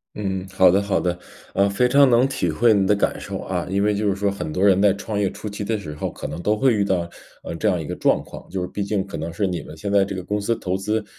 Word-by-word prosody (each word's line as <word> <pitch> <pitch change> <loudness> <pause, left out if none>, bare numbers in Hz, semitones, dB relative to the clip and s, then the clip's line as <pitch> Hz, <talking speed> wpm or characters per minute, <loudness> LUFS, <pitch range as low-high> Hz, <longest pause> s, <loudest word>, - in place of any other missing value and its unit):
嗯， 95 -2 -3
好 95 -2 +5
的 95 +2 +3
好 100 -1 0
的。 90 -1 -1 0.4
呃， 100 +1 +3
非 110 +5 +2
常 140 +1 +5
能 120 +2 +4
体 130 -10 -1
会 110 +9 +4
你 100 -2 +2
的 105 - +4
感 100 - 0
受 - - -5
啊， - - -3
因 100 +1 +1
为 105 0 +2
就 105 +1 -1
是 95 - 0
说 100 0 0
很 100 -5 -5
多 90 +5 +1
人 95 -1 +5
在 100 -1 +5
创 100 +1 -4
业 100 -2 +1
初 - - -8
期 105 0 -5
的 110 +2 -1
时 80 -7 -7
候 75 - -4
可 - - -9
能 80 - -5
都 105 +4 +1
会 130 +1 +3
遇 105 -2 +2
到， 90 -3 0 0.4
呃， - - -5
这 95 - -1
样 90 -3 0
一 80 - -5
个 - - -4
状 - - +2
况， - - -12
就 90 0 -3
毕 100 - -3
竟 100 -1 -1
可 100 - -7
能 80 +2 -4
是 90 +5 -1
你 90 -2 -2
们 80 - -11
现 100 +4 -4
在 100 -1 +5
这 100 0 -4
个 95 - -5
公 105 +3 -2
司 115 +3 0
投 95 -4 -2
资， 105 +3 -1
100 Hz, 325 characters per minute, -22 LUFS, 95-105 Hz, 0.4 s, 好